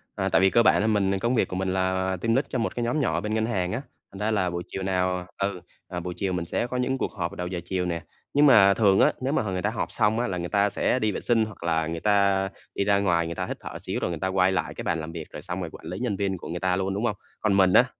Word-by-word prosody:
À, 95 -2 -1
tại 95 - +3
vì 95 - +5
cơ 115 - +4
bản - - +5
là 110 - +1
mình 100 -2 +2
công 120 +5 +1
việc - - +2
của 90 - -5
mình 95 0 -1
là 95 0 0
team 115 0 +2
lead 135 +2 +2
cho 130 - -2
một 115 - -2
cái 120 - -1
nhóm 120 +6 0
nhỏ 85 - +1
bên 105 +1 -3
ngân 110 0 +1
hàng 95 -6 -1
á, 120 +5 -2 0.3
thành 95 - -10
ra 110 +1 0
là 95 -4 +1
buổi 85 0 -4
chiều 95 - -5
nào, 90 -1 0
ờ 100 0 0
ừ, 90 - -9 0.3
à, 90 - -4
buổi 90 +1 -5
chiều 95 -2 -1
mình 90 -2 -2
sẽ 120 - -1
có 125 +1 -3
những 130 +1 0
cuộc - - -2
họp 85 -4 -3
vào - - -10
đầu 90 -1 -4
giờ 90 -1 -3
chiều 90 -1 -1
nè. 85 -2 -3 0.3
Nhưng 145 +1 +5
mà 100 -8 +7
thường 100 -2 +4
á, - - +5
nếu 135 +2 0
mà - - +2
h 105 - -4
người 90 -1 -2
ta - - +1
họp - - -3
xong 110 +2 +2
á 120 - 0
là 90 -2 -2
người 85 0 -4
ta 100 0 +3
sẽ 130 - +1
đi 110 -2 +1
vệ - - -4
sinh 115 -2 +2
hoặc 105 -5 -11
là 80 -2 +1
người 85 0 -3
ta 100 -1 +2 0.3
đi - - +1
ra 100 0 +3
ngoài 85 -4 +2
người 85 0 -4
ta - - -2
hít - - -5
thở - - -8
xíu - - -3
rồi - - -1
người 85 - -4
ta 95 - -1
quay 95 0 +3
lại 90 -3 -1
cái - - -7
bàn 80 - 0
làm 80 +1 -6
việc, 80 -2 -7
rồi - - -8
xong 90 +2 -5
rồi 85 - -4
quản - - -12
lý 90 +4 -5
nhân 120 -5 -1
viên 95 -1 -1
của - - -9
người 85 +1 -3
ta 95 -1 +1
luôn, 95 +1 -1
đúng 105 +4 -1
hông? 105 -4 0 0.2
Còn 110 -2 +1
mình 95 -2 +5
á, - - +7
95 Hz, 335 wpm, -26 LUFS, 90-110 Hz, 0.3 s, mà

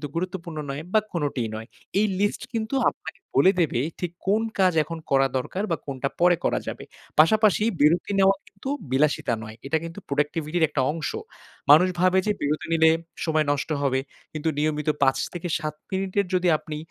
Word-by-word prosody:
গুরুত্বপূর্ণ 170 -2 -4
নয় 140 +2 -4
বা 215 - +6
কোনটিই 145 - -1
নয়। 110 +1 -6 0.3
এই 215 - +4
লিস্ট 205 +1 0
কিন্তু 225 +3 -2
আপনাকে 180 - -10 0.2
বলে 140 +8 +6
দেবে 145 -7 +1 0.2
ঠিক 175 -2 -3 0.2
কোন 210 +3 +3 0.2
কাজ 185 -2 +4
এখন 165 +2 -6
করা 135 0 +4
দরকার 185 +10 -3
বা 165 - +1
কোনটা 135 -1 -3
পরে 175 0 +5
করা - - +1
যাবে। - - -5 0.4
পাশাপাশি 210 +5 +5 0.2
বিরতি 165 +7 +3
নেওয়া 195 0 +5
কিন্তু 200 +7 -8 0.2
বিলাসিতা 140 -2 +2
নয়, 110 0 -9
এটা 160 - +2
কিন্তু 165 +4 -7
প্রোডাক্টিভিটির 155 +3 0
একটা 150 -3 0
অংশ। 160 0 -3 0.6
মানুষ 160 +5 +8
ভাবে 185 +1 +4
যে 210 - +2
বিরতি 150 +2 -1
নিলে 160 0 +5 0.4
সময় 155 -2 +2
নষ্ট 145 +1 -2
হবে, 130 -2 +1 0.3
কিন্তু 155 +1 -1
নিয়মিত 150 0 0
৫-৭ 155 +3 -1 0.2
মিনিটের 195 +1 0
যদি 180 0 +2
আপনি 155 -1 -7
160 Hz, 165 wpm, -25 LUFS, 145-185 Hz, 0.6 s, মানুষ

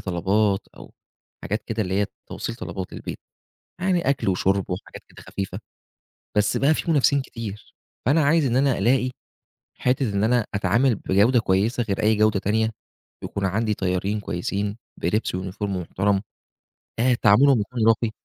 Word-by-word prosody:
طلبات 100 +2 0
أو - - -13 0.5
حاجات 105 +3 -2
كده 115 -1 -1
اللي 95 -1 -3
هي 100 - +1 0.2
توصيل - - -5
طلبات 90 -3 -6
للبيت. - - -6 0.6
يعني 180 -6 +1
أكل 135 -7 +1
وشُرْب 95 +1 +1
وحاجات 90 +2 -6
كده - - -15
خفيفة، 95 -1 -5 0.8
بس 105 -1 +2
بقى 140 +3 +4
في 165 - -1
منافسين 140 -2 +3
كتير. 110 -5 -8 0.3
فأنا 150 +5 +4
عايز 160 +1 +3
إن 125 -2 +1
أنا 135 -1 +3
ألاقي 130 +1 +2 0.7
حتّة 125 -3 +1
إن 100 +1 +1
أنا 120 -1 +2
أتعامل 115 +6 +2
بجودة 105 +5 +3
كويسة 110 +5 +1
غير 110 -1 -2
أي 110 +1 +3
جودة 110 -1 +3
تانية 110 +3 +1 0.5
ويكون 100 - -4
عندي 105 +3 0
طيّارين 95 +3 -1
كويسين 100 +3 -3 0.2
بلبس 90 +2 -1
وuniform 95 +2 -6
محترم، 95 +1 0 0.8
آآ 125 +2 +3
تعاملهم 120 +4 +6
يكون 115 +1 -1
راقي. 115 0 +3
105 Hz, 150 wpm, -24 LUFS, 100-125 Hz, 0.8 s, تعاملهم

